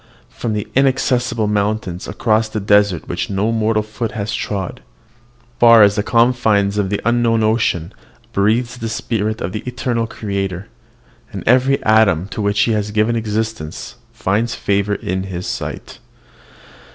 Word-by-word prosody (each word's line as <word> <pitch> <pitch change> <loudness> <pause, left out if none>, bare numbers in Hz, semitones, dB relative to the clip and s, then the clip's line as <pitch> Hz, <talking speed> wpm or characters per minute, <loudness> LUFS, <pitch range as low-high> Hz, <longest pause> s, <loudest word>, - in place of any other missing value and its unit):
From 115 - -3
the 105 -1 -3
inaccessible 130 -3 +1
mountains, 105 -3 -1
across 110 -1 +1
the 110 - -3
desert 100 -3 +2
which - - -3
no 100 +3 0
mortal 110 -1 +1
foot 110 +1 -5
has 105 -1 -3
trod, 95 -3 -4 0.8
far 115 -2 +8
as 100 -1 +5
the 105 - 0
confines 110 -4 +2
of 100 -2 0
the 105 - -1
unknown 115 -1 +2
ocean, 110 -6 0 0.4
breathes 115 +5 +1
the 115 - -3
spirit 110 -1 -2
of 90 - -3
the 105 - -4
eternal 120 -2 -2
Creator; 100 -4 -4 0.6
and - - -6
every 130 +3 +3
atom 105 -6 +3
to 110 - -4
which 100 0 +1
he 115 - +2
has 105 -1 -1
given 110 +2 +1
existence 110 -3 -4
finds 115 0 -1
favour 100 +1 0
in 95 0 -3
his 90 -2 -5
sight. - - -6
110 Hz, 150 wpm, -18 LUFS, 100-115 Hz, 0.8 s, far